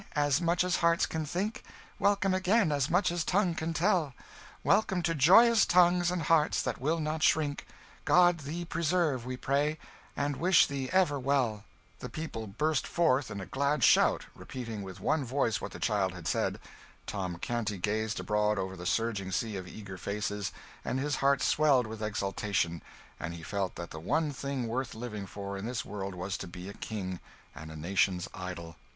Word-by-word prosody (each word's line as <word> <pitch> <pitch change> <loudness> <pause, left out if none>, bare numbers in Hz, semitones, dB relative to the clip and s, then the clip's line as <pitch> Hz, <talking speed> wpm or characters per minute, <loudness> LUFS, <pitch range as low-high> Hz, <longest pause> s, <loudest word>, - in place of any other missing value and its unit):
as 145 +1 +2
much 170 +1 +2
as 180 0 +1
hearts 170 0 +3
can 160 -1 -3
think; 190 +8 -3 0.4
Welcome, 200 -1 +2
again, 185 -1 +3
as 140 -2 +1
much 180 +1 +2
as 175 -2 -1
tongue 185 -1 +2
can 165 0 -3
tell, 165 - +1 0.5
Welcome 195 -3 +2
to 165 0 +1
joyous 215 - +6
tongues, 175 0 +4
and 180 -2 -1
hearts 155 0 +3
that - - -3
will 160 +5 +1
not 155 0 -2
shrink: 150 -2 +1 0.4
God 175 -1 +5
thee 160 +4 -5
preserve, 165 -6 0
we 130 0 -4
pray, 145 +4 0 0.4
and 145 -1 -1
wish 180 +1 +5
thee 135 -2 -4
ever 180 -6 +3
well.' 125 -6 0 0.3
The 125 - -6
people 115 -5 -5
burst 150 +8 0
forth 145 -6 +2
in 100 - -5
a 95 - -5
glad 140 - 0
shout, - - +5
repeating 115 -5 -7
with 95 -2 -8
one 155 -2 +1
voice 125 -3 0
what - - -4
the - - -8
child 100 -4 +1
had 90 -2 -7
said. - - 0 0.5
Tom 90 -4 -4
Canty 110 +1 -2
gazed 110 +4 -1
abroad 105 0 +1
over 95 0 -3
the 90 0 -6
surging 105 -4 -1
sea 110 +3 -1
of 95 -2 -6
eager 95 -1 -9
faces, 105 0 -3 0.3
and 130 - -2
his 145 +1 -1
heart 140 -1 +2
swelled 145 -5 +4
with 110 0 -7
exultation; 100 -4 -1 0.4
and 85 0 -4
he 85 - -10
felt 100 +1 -2
that 85 -1 -7
the 80 - -7
one 150 - 0
thing 140 -2 -3
worth 125 +1 -3
living 105 -4 -6
for 100 +1 -6
in 100 - -5
this 120 0 -3
world 100 -2 -5
was 90 +2 -3
to - - -6
be 90 +1 -9
a 100 - -7
king, 95 -5 -5 0.3
and 80 +2 -9
a 80 - -9
nation's 90 +2 0
idol. 85 -3 -7
130 Hz, 185 wpm, -30 LUFS, 100-160 Hz, 0.5 s, joyous